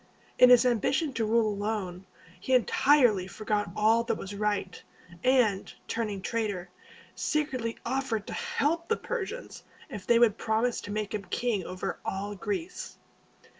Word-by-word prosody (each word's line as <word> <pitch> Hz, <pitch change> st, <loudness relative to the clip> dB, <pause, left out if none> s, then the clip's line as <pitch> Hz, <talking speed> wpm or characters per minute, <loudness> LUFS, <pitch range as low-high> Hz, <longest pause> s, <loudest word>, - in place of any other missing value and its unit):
In 250 Hz, -, +9 dB
his 250 Hz, 0 st, +7 dB
ambition 265 Hz, +5 st, +1 dB
to 225 Hz, -, 0 dB
rule 225 Hz, +1 st, +3 dB
alone, 200 Hz, -3 st, -3 dB, 0.3 s
he 260 Hz, -, +1 dB
entirely 245 Hz, -5 st, +4 dB
forgot 210 Hz, 0 st, -2 dB
all 225 Hz, +2 st, +4 dB
that -, -, 0 dB
was 195 Hz, -, -7 dB
right, 205 Hz, -2 st, -2 dB, 0.4 s
and, 245 Hz, -7 st, +2 dB, 0.2 s
turning 210 Hz, -4 st, -3 dB
traitor, 205 Hz, -6 st, -2 dB, 0.4 s
secretly 260 Hz, -7 st, -1 dB
offered 245 Hz, -4 st, -1 dB
to -, -, -6 dB
help 335 Hz, +4 st, -1 dB
the 450 Hz, -, +1 dB
Persians 485 Hz, +1 st, -5 dB, 0.3 s
if 205 Hz, -6 st, -7 dB
they 235 Hz, -, +5 dB
would 230 Hz, -3 st, +4 dB
promise 225 Hz, +2 st, 0 dB
to 205 Hz, -, -7 dB
make 210 Hz, 0 st, -3 dB
him 205 Hz, -2 st, -3 dB
king 235 Hz, -6 st, -1 dB
over 185 Hz, 0 st, -4 dB
all 200 Hz, +2 st, -3 dB
Greece. 360 Hz, -, -5 dB
225 Hz, 145 wpm, -28 LUFS, 205-255 Hz, 0.4 s, In